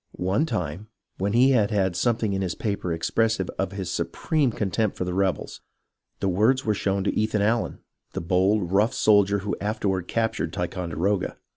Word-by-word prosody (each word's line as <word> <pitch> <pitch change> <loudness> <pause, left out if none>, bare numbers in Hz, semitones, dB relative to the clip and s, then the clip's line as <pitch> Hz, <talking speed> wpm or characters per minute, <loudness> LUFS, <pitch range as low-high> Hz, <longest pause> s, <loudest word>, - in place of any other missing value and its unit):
One 95 - 0
time, 95 - -3 0.3
when 100 +2 0
he 130 +3 +5
had 110 -6 +3
had 95 -4 +1
something 110 +1 +1
in 95 - -1
his 90 -3 -2
paper, 100 -5 -2
expressive 95 +4 0
of 95 -1 -1
his 95 -3 -4
supreme 150 -6 0
con 105 -3 -2
tempt 110 +3 0
for - - -1
the 90 - -3
rebels, 95 -1 -1 0.6
the 100 - +1
words 110 +8 +2
were 110 - +2
shown 100 -1 -1
Ethan 105 0 +1
Allen, 110 +2 0 0.3
the - - -2
bold, 90 +2 +1
rough 105 +6 +2
soldier 100 -1 +4
who 105 - -1
afterward 100 -3 -1
captured 110 -7 -1
Ticon 90 0 -3
deroga. 95 +5 0
100 Hz, 175 wpm, -25 LUFS, 95-110 Hz, 0.6 s, he